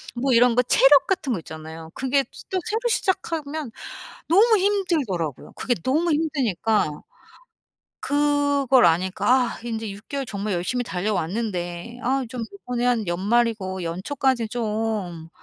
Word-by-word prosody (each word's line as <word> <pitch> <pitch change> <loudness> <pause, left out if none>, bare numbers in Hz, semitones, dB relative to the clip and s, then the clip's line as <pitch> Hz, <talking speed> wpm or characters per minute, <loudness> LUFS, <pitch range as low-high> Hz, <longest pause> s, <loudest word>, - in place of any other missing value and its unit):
뭐 260 +2 0
이런 240 0 +5
거 250 - +5
체력 270 +3 +5
같은 305 -9 0
거 190 - -2
있잖아요. 160 0 -9
그게 270 +1 +1
스 - - -13
또 375 - 0
새로 440 +2 0
시작하면 315 - -1 0.6
너무 430 +5 +6
힘들더라고요. 310 - -1
그게 245 - 0
너무 320 +6 +1
힘드니까. 225 - 0 1.0
그걸 285 -3 +3
아니까 195 +9 +2
아 - - -12
인제 225 -2 -4
6 200 +2 -12
개월 280 -1 -3
정말 205 -2 -3
열심히 230 +9 -1
달려왔는데 185 +1 -3
아 265 +2 +1
좀 245 -2 -4
이번에 250 -11 -4
한 240 -3 +2
연말이고 195 0 0
연초까지 235 +8 -1
좀 215 -8 -3
240 Hz, 290 characters per minute, -23 LUFS, 190-280 Hz, 1.0 s, 너무